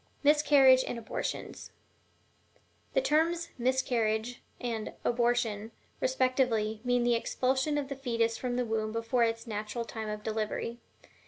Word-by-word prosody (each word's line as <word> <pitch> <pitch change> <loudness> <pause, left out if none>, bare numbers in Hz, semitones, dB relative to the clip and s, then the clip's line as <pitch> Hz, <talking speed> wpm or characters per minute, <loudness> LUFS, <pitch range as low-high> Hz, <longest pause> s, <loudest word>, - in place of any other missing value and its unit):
MISCARRIAGE 285 -3 +6
AND - - -3
ABORTIONS. 230 - -5 1.3
The - - +4
terms 335 0 +1
"miscarriage," 240 -2 0 0.2
and 230 -3 -3
"abortion," 235 -3 +1 0.3
respectively, 255 -5 +1
mean 245 -1 +2
the 240 0 +3
expulsion 260 +5 0
of 285 -2 -2
the 275 - -5
fetus 230 -4 0
from 245 0 -3
the 250 0 0
womb 220 -1 -1
before 230 +2 +1
its 230 0 -2
natural 215 +1 -4
time 220 -2 -5
of 210 0 -5
delivery. 220 +2 -3
240 Hz, 130 wpm, -30 LUFS, 225-260 Hz, 1.3 s, MISCARRIAGE